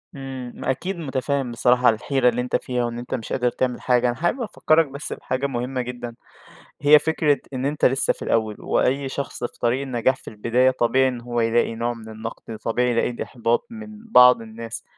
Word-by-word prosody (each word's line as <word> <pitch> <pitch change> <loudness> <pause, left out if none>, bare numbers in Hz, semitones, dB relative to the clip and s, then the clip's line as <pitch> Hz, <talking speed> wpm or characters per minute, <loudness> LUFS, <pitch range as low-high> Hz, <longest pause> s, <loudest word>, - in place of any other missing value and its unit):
امم. 135 -2 -7
ما - - -1
أكيد 180 +7 -4
متفهِم 135 -3 -2
بصراحة 125 +2 +4
الحيرة 125 +3 +2
اللي 120 +1 -1
أنت 125 - -2
فيها، 125 -1 -1
وإن 120 0 -4
أنتَ 120 - -7
مش 115 -4 -6
قادر 125 -1 +1
تعمل 125 0 -2
حاجة. 125 -1 +2
أنا 120 - 0
حابب 175 - -1
أفكَّرك 165 -7 +2
بس 140 +2 -6
بحاجة 135 +2 -2
مهمّة 125 0 -3
جدًا، 120 -1 -6 0.7
هي 150 +1 +7
فكرة 150 -1 +1
إن 130 +1 -2
أنتَ 150 +1 -1
لسَّه 135 +1 +3
في - - -13
الأوّل، 110 -2 0
وأي 135 +1 0
شخص 140 -2 -5
في - - -6
طريق 120 +3 +1
النجاح 130 -1 0
في - - -12
البداية 120 +4 +2
طبيعي 130 +1 +2
إن 125 -2 -4
هو 120 0 -2
يلاقي 115 0 +1
نوع 120 +1 -1
من 110 -1 -11
النقد. 110 0 -7
طبيعي 125 +3 0
يلاقي 120 0 0
إحباط 120 - -1
من 220 -1 -10
بعض 125 -2 +7
الناس، 115 0 -8
125 Hz, 195 wpm, -23 LUFS, 120-135 Hz, 0.7 s, هي